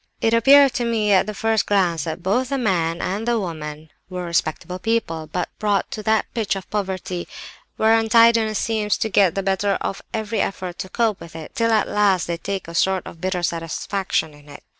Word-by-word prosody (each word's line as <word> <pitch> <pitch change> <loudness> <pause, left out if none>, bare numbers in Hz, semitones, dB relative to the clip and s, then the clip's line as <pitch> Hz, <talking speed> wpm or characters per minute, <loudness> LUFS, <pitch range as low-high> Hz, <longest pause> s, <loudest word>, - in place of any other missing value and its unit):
"It 225 - +1
appeared 275 +3 +6
to 240 - -1
me, 220 -3 +1
at 190 +1 +4
the 215 - -3
first 220 0 +1
glance, 175 -6 +1
that 165 +1 -5
both 245 +7 +1
the 275 - -1
man 175 -8 0
and 205 +5 -3
the 235 -1 +2
woman 155 -4 -6 0.2
were 180 -1 -5
respectable 170 +2 -2
people, 180 -8 -1
but 180 - -2
brought 205 -2 0
to 215 - -5
that 220 0 +2
pitch 220 -4 -1
of 190 -2 -7
poverty 190 -3 -3 0.5
where 220 +1 +4
untidiness 225 -1 +4
seems 215 -2 0
to 220 - -1
get 195 -5 +3
the 195 - -1
better 195 +1 +1
of 195 - -4
every 220 -1 -2
effort 185 -2 -4
to 190 - -5
cope 225 -1 0
with 165 -1 -11
it, 160 -1 -9
till 230 -3 +1
at 220 -1 +2
last 200 -4 +2
they 170 -1 -3
take 195 +1 -4
a 170 - -8
sort 190 +1 +1
of 165 - -11
bitter 185 -1 -2
satisfaction 165 0 -2
in 145 0 -17
it. 145 - -12
195 Hz, 205 wpm, -22 LUFS, 175-220 Hz, 0.5 s, appeared